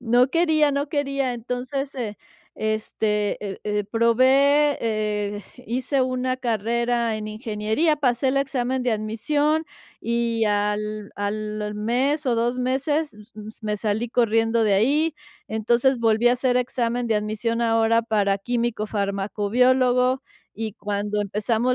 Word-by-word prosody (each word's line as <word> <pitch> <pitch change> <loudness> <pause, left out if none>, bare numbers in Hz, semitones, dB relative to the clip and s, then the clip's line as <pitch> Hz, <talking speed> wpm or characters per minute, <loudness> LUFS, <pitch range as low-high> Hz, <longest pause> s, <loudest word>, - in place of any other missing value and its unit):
no 245 +2 +3
quería, 315 -2 +3
no 280 +1 -1
quería. 275 -3 -1
Entonces, 250 +4 -4
eh, 225 -5 -4 0.4
este, 215 -1 -1
eh 195 -1 -6
eh, 210 -1 -1
probé, 270 +5 +4
eh, 210 -2 -2 0.2
hice 255 +3 -1
una 255 0 0
carrera 235 0 0
en 215 0 -5
ingeniería, 220 +7 0
pasé 260 -2 +1
el 265 - 0
examen 260 -2 -1
de 245 -2 +1
admisión 290 +9 0 0.4
y 235 -1 0
al 210 0 -1
al 210 +1 -3
mes 255 +8 0
o 240 - +2
2 240 +2 0
meses 280 +4 0 0.2
m 215 0 -8
me 210 -1 -1
salí 215 +3 -1
corriendo 225 -1 +2
de 205 -2 +3
ahí. 290 +10 +2 0.3
Entonces, 235 +4 +2
volví 225 +1 +3
a - - +4
hacer 250 0 +1
examen 245 -1 -1
de 220 - +2
admisión 215 +2 -2
ahora 225 0 +3
para 205 -3 +1
químico-fármaco-biólogo, 240 +3 +1 0.4
y 220 -1 -3
cuando 205 0 -2
empezamos 220 +5 0
235 Hz, 130 wpm, -23 LUFS, 215-255 Hz, 0.4 s, probé